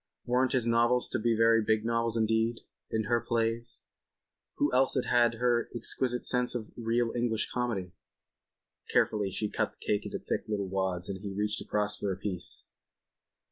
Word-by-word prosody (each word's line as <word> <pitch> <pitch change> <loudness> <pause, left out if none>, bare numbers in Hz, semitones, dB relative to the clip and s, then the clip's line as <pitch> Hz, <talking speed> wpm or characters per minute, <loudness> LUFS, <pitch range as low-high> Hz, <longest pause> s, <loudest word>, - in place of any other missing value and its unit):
Weren't 125 +1 +2
his 125 -3 +2
novels 120 +1 +3
to - - -1
be 115 0 +1
very 115 0 +5
big 110 0 +1
novels 115 0 +1
indeed? 110 +1 +1 0.3
And 110 -1 -1
her 120 +1 +1
plays. 115 0 -2 0.7
Who - - +1
else 130 +2 +3
had 120 -1 +3
her 120 0 +1
exquisite 125 +1 0
sense 125 0 +1
of 110 -3 -5
real 115 0 0
English 120 -2 0
Comedy?... 110 -8 -2 1.0
Carefully 105 -2 +2
she 105 +3 -2
cut - - -1
the - - -28
cake 105 - +1
into - - -4
thick - - -3
little 100 -3 -2
wads 95 -2 -1
and 95 -1 -4
he 100 -1 -5
reached 105 +2 -1
across 105 0 -1
for 100 - -1
a 95 - -3
piece. 95 -2 -4
115 Hz, 170 wpm, -30 LUFS, 105-120 Hz, 1.0 s, very